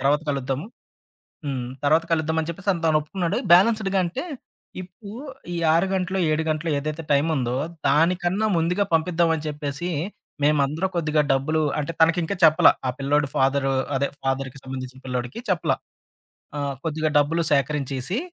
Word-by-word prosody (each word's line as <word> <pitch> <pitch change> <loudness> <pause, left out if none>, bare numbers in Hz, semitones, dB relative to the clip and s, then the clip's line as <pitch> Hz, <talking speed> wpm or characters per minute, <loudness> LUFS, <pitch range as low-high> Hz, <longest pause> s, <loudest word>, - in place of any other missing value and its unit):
తర్వాత 140 +2 +3
కలుద్దాము. 135 +3 -2 0.8
హ్మ్. 130 -3 -3 0.2
తర్వాత 155 +3 +4
కలుద్దామని 160 0 0
చెప్పేసని 185 0 -2
తను 155 -1 +4
ఒప్పుకున్నాడు. 175 +5 -2
బ్యాలెన్స్‌డ్‌గ 195 +2 +4
అంటే 175 - -4 0.6
ఇప్పు, 185 +3 -13 0.5
ఈ - - -2 0.2
ఆరు 170 +3 +3
గంటలో, 185 0 -1
ఏడు 155 +1 +1
గంటలో 155 +2 -1
ఏదైతే 155 +3 -4
టైముందో, 140 -4 +1 0.3
దానికన్నా 175 +7 +2
ముందుగా 180 +5 +1
పంపిద్దామని 165 -1 +1
చెప్పేసి, 150 +3 -4 0.6
మేమందరూ 150 +4 +2
కొద్దిగా 155 -2 +2
డబ్బులు 155 +4 +1 0.2
అంటే, 150 +3 -3
తనకింకా 165 +3 +3
చెప్పల. 160 +2 +7 0.2
ఆ - - +3
పిల్లోడు 145 +1 +1
ఫాదరు 135 0 +2 0.2
అదే 140 +1 +1 0.2
ఫాదర్‌కి 135 0 -2
సంబంధించిన 130 0 -7
పిల్లోడికి 125 - -3
చెప్పల. 175 -4 +1 0.9
ఆహ్, 140 -1 -2
కొద్దిగా 155 -1 -1
డబ్బులు 160 +4 +2
సేకరించేసి, 140 - 0
155 Hz, 130 wpm, -24 LUFS, 140-170 Hz, 0.9 s, చెప్పల